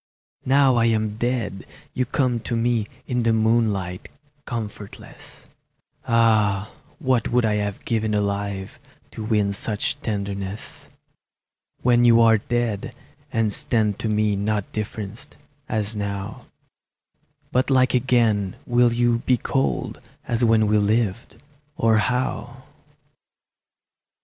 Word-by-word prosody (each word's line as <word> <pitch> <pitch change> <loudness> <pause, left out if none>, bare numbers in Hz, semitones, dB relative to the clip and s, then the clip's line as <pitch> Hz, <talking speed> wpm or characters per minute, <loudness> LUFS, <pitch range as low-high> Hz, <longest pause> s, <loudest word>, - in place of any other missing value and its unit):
Now 135 -2 +4
I 115 - +3
am 110 -2 0
dead 120 -5 -2 0.3
you 130 - 0
come 125 -3 0
to 115 +1 -3
me 115 -2 +1 0.2
In 125 -1 -1
the 115 -1 +2
moonlight, 110 -5 0 0.4
comfortless; 105 -4 -8 0.6
Ah, 110 -3 +2 0.3
what 130 -8 +1
would 120 -1 +2
I 110 - +2
have 105 -1 -4
given 110 -2 0
alive 100 -1 -2 0.3
To 110 - -7
win 105 -2 +1
such 115 +7 -1
tenderness! 100 -2 -5 1.0
When 120 -1 +4
you 115 -1 +6
are 115 -1 +5
dead, 120 -2 -2 0.4
and 110 -2 +1
stand 105 -3 0
to 110 - -2
me 105 -1 +1
Not 105 0 -2
differenced, 110 +2 -6 0.3
as 110 -1 -1
now, 100 0 -5 1.0
But 130 +2 +1
like 130 -1 +3
again, 115 -6 +2
will 120 0 +3
you 120 0 +2
be 125 +1 +2
cold 135 +3 -2 0.3
As 120 0 0
when 110 -2 +4
we 105 0 +3
lived, 110 +1 -1 0.4
or 115 -1 +3
how? 125 +2 -2
110 Hz, 120 wpm, -23 LUFS, 105-120 Hz, 1.0 s, you